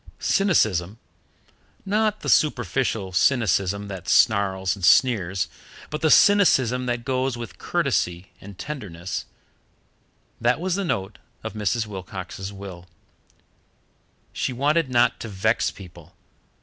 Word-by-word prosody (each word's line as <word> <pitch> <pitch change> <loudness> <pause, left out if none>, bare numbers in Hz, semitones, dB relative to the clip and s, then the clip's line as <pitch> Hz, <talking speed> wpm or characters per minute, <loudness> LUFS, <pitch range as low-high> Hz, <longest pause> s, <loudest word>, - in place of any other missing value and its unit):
Cynicism 110 - +1 0.9
not 215 +1 0
the - - -6
superficial 120 -7 +1
cynicism 100 -2 +1
that 95 -3 -7
snarls 95 -2 +3
and 100 - -12
sneers, 95 -3 +3 0.4
but 150 - -4
the 160 - +3
cynicism 130 - +4
that 120 - +1
can 120 - -10
go 130 0 0
with 115 -6 -8
courtesy 90 +2 -1
and 100 -1 -11
tenderness 95 - -6 1.2
that - - +2
was 185 +1 -1
the 200 +2 -1
note 100 - -3 0.2
of - - -5
Mrs. 110 +2 -1
Wilcox's 95 -1 -7
will. 95 -3 -10 1.5
She - - -2
wanted 145 +4 +1
not 120 -1 +2
to - - -6
vex 110 +3 +1
people. 90 -3 -14
110 Hz, 120 wpm, -23 LUFS, 95-135 Hz, 1.5 s, cynicism